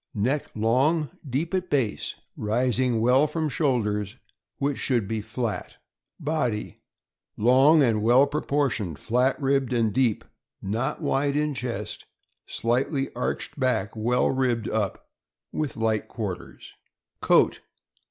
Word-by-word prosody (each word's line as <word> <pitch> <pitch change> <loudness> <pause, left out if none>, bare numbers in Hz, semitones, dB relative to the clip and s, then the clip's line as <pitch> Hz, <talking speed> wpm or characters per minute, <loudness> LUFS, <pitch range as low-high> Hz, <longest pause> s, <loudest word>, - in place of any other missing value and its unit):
— - - -58
Neck 130 +8 0
long, 130 +7 +2 0.2
deep 155 +8 -2
at 185 -1 -1
base, 125 -8 -1 0.2
rising 120 +2 +1
well 130 +5 +4
from 155 0 -2
shoulders, 110 - 0 0.4
which 140 -1 -1
should 120 -7 0
be 110 0 -2
flat. 110 +1 -4 0.4
Body. 145 -9 -2 0.3
— - - -66 0.2
Long 135 +7 +5
and 110 -4 +2
well 120 +5 +5
proportioned, 140 - -1
flat 125 +3 +1
ribbed, 135 -2 +1
and 115 -3 +1
deep, 120 -3 +1 0.4
not 120 - -2
wide 140 0 +1
in 150 0 +1
chest; 125 -3 -5 0.4
slightly 135 +4 -1
arched 125 +3 -3
back, 125 -6 0
well 120 +3 +1
ribbed 125 -4 0
up, 105 -3 -2 0.4
with 150 -5 -3
light 110 -1 0
quarters. 105 -6 -6 0.5
Coat. - - +4
125 Hz, 125 wpm, -25 LUFS, 110-140 Hz, 0.5 s, Long